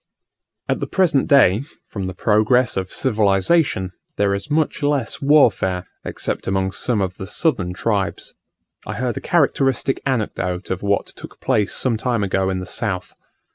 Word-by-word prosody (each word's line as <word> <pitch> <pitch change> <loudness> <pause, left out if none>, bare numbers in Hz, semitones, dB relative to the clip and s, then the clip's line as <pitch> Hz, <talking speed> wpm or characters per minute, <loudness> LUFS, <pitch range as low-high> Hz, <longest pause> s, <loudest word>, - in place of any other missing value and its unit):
At - - 0
the - - -3
present 170 -8 +2
day, 130 -5 +5 0.2
from 95 -3 -5
the 95 - -6
progress 110 +5 +2
of 95 -1 -3
civilization, 105 - +1 0.3
there 100 -1 +2
is 100 +8 -4
much 155 +1 0
less 145 -5 -1
warfare, 115 -11 +3 0.2
except - - -4
among 95 0 0
some 110 +2 0
of 95 -1 -3
the 95 - -7
southern 100 - 0
tribes. 95 -5 -2 0.5
I - - -4
heard 125 -1 -2
a - - -4
characteristic 135 -5 +1
anecdote 100 -8 -2
of 95 - -2
what 100 0 0
took - - -12
place 105 -2 +1
some 120 -4 +1
time 115 -2 -1
ago 95 -1 0
in 95 - -1
the 90 - -5
south. 90 0 -3
105 Hz, 160 wpm, -20 LUFS, 95-135 Hz, 0.5 s, day